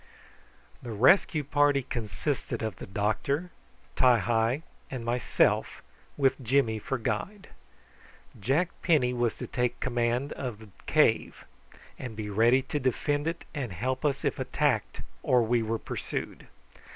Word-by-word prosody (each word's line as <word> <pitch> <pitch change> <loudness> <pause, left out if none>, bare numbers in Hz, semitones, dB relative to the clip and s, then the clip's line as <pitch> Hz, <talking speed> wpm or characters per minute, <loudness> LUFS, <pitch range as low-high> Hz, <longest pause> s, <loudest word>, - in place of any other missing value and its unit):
The 120 - -6
rescue 150 - +4
party 145 -1 +2
consisted 120 +3 -3
of 110 -5 -3
the - - -8
doctor, 110 - -1 0.4
Ti 125 -2 +5
hi, 115 - +1 0.3
and 125 -3 -5
myself, 120 +1 +1 0.3
with 135 0 +2
Jimmy 120 -3 +2
for 135 +5 -2
guide. 200 - -3 0.9
Jack 140 - +1
Penny 140 -8 +3
was 120 -2 0
to - - -5
take 125 -1 -1
command 120 +2 0
of 125 -5 -5
the 110 -1 -14 0.2
cave, - - +2 0.5
and 125 -4 -6
be 105 -1 -5
ready 120 +5 +4
to 145 +2 -3
defend 145 +3 0
it 165 +1 -3
and 130 - -4
help 130 - -2
us 140 -2 0
if - - 0
attacked - - 0 0.2
or 125 -2 +3
we 120 +1 +2
were 115 +1 -1
pursued. - - -5
125 Hz, 140 wpm, -28 LUFS, 115-140 Hz, 0.9 s, Ti